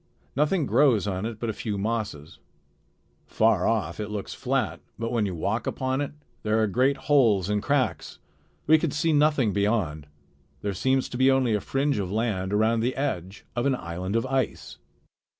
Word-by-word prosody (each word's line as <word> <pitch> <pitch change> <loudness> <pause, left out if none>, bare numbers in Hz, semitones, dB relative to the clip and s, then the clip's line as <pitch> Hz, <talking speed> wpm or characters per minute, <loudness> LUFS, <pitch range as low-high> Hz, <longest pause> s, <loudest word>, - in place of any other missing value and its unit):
Nothing 150 +3 +2
grows 125 -9 +3
on 95 +1 -2
it 115 -2 -7
but 115 -2 -1
a - - -8
few 105 0 -4
mosses. 100 -8 -3 0.9
Far 110 -4 +2
off 105 -7 -1
it 105 -1 -3
looks 105 -2 -5
flat, - - -1 0.2
but 115 0 -3
when 115 -4 +1
you 95 - -4
walk 110 +7 -2
upon 130 +1 -1
it, 145 - -3 0.3
there 110 +1 +1
are 110 - +3
great 130 +7 +2
holes 115 -10 +3
and 105 0 +1
cracks. 140 +1 -1 0.5
We 160 +1 +6
could 160 -3 -1
see 155 +2 +1
nothing 145 -7 +3
beyond. 100 -8 0 0.6
There 100 -1 -1
seems 130 +7 +1
to 125 - -5
be 130 +1 +5
only 130 -4 +3
a 105 - +1
fringe 140 +1 0
of 95 -2 -3
land 100 -4 -1
around 110 +2 +2
the 120 +3 0
edge 100 -9 -3
of 120 +3 +1
an 135 - +2
island 90 0 -4
of 115 - +1
ice." 130 -1 -2
115 Hz, 185 wpm, -26 LUFS, 100-135 Hz, 0.9 s, We